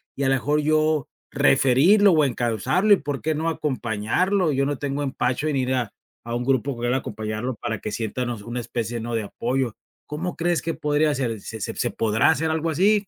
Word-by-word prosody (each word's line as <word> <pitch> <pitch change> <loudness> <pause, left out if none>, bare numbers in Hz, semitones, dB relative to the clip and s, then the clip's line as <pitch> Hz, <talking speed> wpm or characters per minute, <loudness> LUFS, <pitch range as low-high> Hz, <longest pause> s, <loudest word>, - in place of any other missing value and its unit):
y, 140 - -2
a 135 - +2
lo - - +4
mejor, 150 +4 +1
yo 155 -2 +2 0.2
referirlo 155 - +5
o 155 -2 +4
encausarle, 125 - +2
y, - - -5
¿por 145 -3 -4
qué 155 -1 0
no, 160 +2 -1
acompañarlo? 150 - 0
Yo 135 0 +1
no 145 0 -1
tengo 145 0 -2
empacho 130 +1 -1
en 150 -3 0
ir 130 0 0
a 120 -5 -2 0.3
a 115 - -4
un 120 - -1
grupo 135 +1 +1
con 120 0 -4
él 120 - +1
a - - +2
acompañarlo 110 +1 -4
para 110 0 -3
que 105 - -5
sienta, 115 +3 -3
¿no?, 120 0 -3
una 120 +1 -3
especie, 120 0 -3
¿no?, 115 +1 -5
de 110 - -1
apoyo. 120 +2 -2 0.3
¿Cómo 165 +5 -4
crees 175 0 0
que 165 - -1
podría 150 +1 +1
hacer? 125 -6 -2
¿Se 110 -2 -8
se - - -4
se - - -1
podrá 110 +3 +2
hacer 160 0 0
algo 160 +1 -1
así? 200 +5 +2
135 Hz, 220 wpm, -23 LUFS, 120-155 Hz, 0.3 s, referirlo